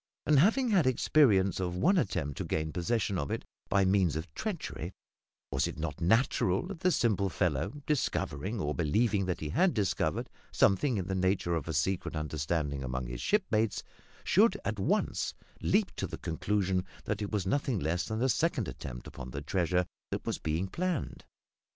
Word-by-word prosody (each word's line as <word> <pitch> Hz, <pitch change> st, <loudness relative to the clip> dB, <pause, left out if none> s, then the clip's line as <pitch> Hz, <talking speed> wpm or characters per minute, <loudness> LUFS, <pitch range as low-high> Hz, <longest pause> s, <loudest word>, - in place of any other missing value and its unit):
And, 150 Hz, -3 st, +5 dB
having 230 Hz, -, +4 dB
had 185 Hz, -10 st, +4 dB
experience 115 Hz, -8 st, +4 dB
of 90 Hz, -1 st, -2 dB
one 180 Hz, -, +3 dB
attempt 80 Hz, -, -2 dB
to -, -, -1 dB
gain 80 Hz, 0 st, -2 dB
possession 100 Hz, +1 st, 0 dB
of 70 Hz, -, -3 dB
it -, -, -3 dB, 0.2 s
by 100 Hz, -1 st, +3 dB
means 95 Hz, -5 st, +3 dB
of 80 Hz, 0 st, -5 dB
treachery, 150 Hz, -, -4 dB, 0.6 s
was -, -, +1 dB
it -, -, -6 dB
not -, -, -4 dB
natural 95 Hz, -, +2 dB
that 190 Hz, -2 st, -7 dB
the 185 Hz, -, +3 dB
simple 100 Hz, -, +2 dB
fellow, 100 Hz, -, -1 dB
discovering, 110 Hz, -, -1 dB
or 75 Hz, -3 st, -1 dB
believing 95 Hz, +5 st, +1 dB
that 90 Hz, -, -2 dB
he 75 Hz, -, -3 dB
had 180 Hz, -, +2 dB
discovered, 100 Hz, -5 st, 0 dB, 0.2 s
something 115 Hz, +5 st, +3 dB
in 95 Hz, -, -2 dB
the 95 Hz, -, -2 dB
nature 95 Hz, -2 st, +1 dB
of 80 Hz, -3 st, -2 dB
a 80 Hz, -, -2 dB
secret 85 Hz, +3 st, 0 dB
understanding 75 Hz, -2 st, -2 dB
among 65 Hz, 0 st, -3 dB
his -, -, -5 dB
shipmates, 115 Hz, -, +1 dB, 0.4 s
should 205 Hz, +1 st, +4 dB
at 110 Hz, -2 st, -2 dB
once 95 Hz, -, 0 dB, 0.3 s
leap -, -, +1 dB
to -, -, -2 dB
the -, -, -6 dB
conclusion 95 Hz, +2 st, 0 dB, 0.2 s
that 105 Hz, 0 st, -2 dB
it 105 Hz, -, -2 dB
was 105 Hz, -4 st, -1 dB
nothing 130 Hz, +3 st, 0 dB
less 85 Hz, +1 st, -1 dB
than 110 Hz, +2 st, -1 dB
a -, -, +4 dB
second -, -, +1 dB
attempt -, -, -7 dB
upon 60 Hz, -, -8 dB
the 70 Hz, +3 st, -5 dB
treasure 90 Hz, +1 st, +1 dB, 0.2 s
that -, -, -4 dB
was -, -, -2 dB
being 80 Hz, +4 st, -1 dB
planned? 160 Hz, -, -3 dB
95 Hz, 180 wpm, -31 LUFS, 80-120 Hz, 0.6 s, And